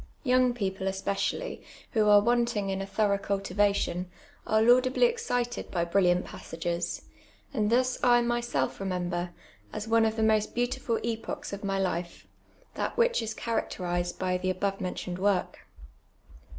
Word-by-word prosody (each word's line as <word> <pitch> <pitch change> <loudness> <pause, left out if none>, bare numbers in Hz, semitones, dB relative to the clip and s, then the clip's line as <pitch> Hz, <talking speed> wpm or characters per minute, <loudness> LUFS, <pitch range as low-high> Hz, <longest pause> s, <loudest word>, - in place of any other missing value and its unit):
Young 255 -2 +3
people 190 -3 -2
especially, 195 - -2 0.3
who 215 -3 +3
are 205 0 +8
wanting 235 -3 +1
in 190 0 -2
a 195 - -5
thorough 200 -1 +1
cultivation, 200 -2 0 0.4
are 220 - +3
laudably 255 - +5
excited 355 - -1
by 170 -2 0
brilliant 180 0 +2
passages; 170 +1 -4 0.5
and 215 -5 +1
thus 255 +1 +2
I 240 -1 +6
myself 235 - -1
remember, 180 -2 -2 0.4
as 215 - -5
one 225 0 +4
of 220 0 0
the 220 - 0
most 215 -1 +2
beautiful 240 -1 0
epochs 225 -3 -4
of 200 - -6
my 195 -1 -1
life, 180 -2 -2 0.5
that - - -3
which 480 - +3
is 225 -1 -4
characterised 175 -6 -2
by 185 -1 0
the 185 +1 -1
above 195 +1 -1
mentioned 180 0 -4
work. 195 -1 0
205 Hz, 145 wpm, -28 LUFS, 185-235 Hz, 0.5 s, are